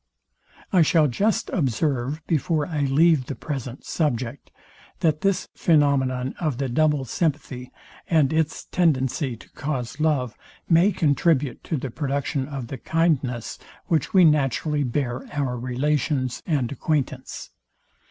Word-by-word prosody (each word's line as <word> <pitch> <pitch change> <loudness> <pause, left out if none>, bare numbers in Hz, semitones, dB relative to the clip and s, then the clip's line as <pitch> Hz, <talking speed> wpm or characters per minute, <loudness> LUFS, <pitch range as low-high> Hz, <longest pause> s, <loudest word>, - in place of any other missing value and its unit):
I. 180 - +6
shall 160 0 +4
just 200 - 0
observe, 140 0 -1
before 155 -1 0
I 150 -3 -1
leave 145 -1 +3
the 140 - -4
present 135 -4 -6
subject, 130 -4 -2 0.5
that 155 -2 +2
this 195 -1 +1
phænomenon 135 -5 +2
of 155 -8 -1
the 135 0 -1
double 150 +1 +2
sympathy, 135 -3 -2 0.4
and 155 -4 +3
its 160 0 0
tendency 135 -6 0
to - - -16
cause 135 -3 -4
love, 140 -7 +1 0.3
may 175 +4 +5
contribute 145 - +1
to 160 - -1
the 130 -2 -5
production 140 -1 -2
of 140 -4 -5
the 135 - -6
kindness, 140 -8 0 0.3
which 165 +3 +1
we 185 -4 +6
naturally 150 0 +2
bear 125 -1 -2
our 140 -4 -1
relations 130 +1 -1
and 140 -8 0
acquaintance. 135 -2 -3
145 Hz, 130 wpm, -24 LUFS, 130-160 Hz, 0.5 s, I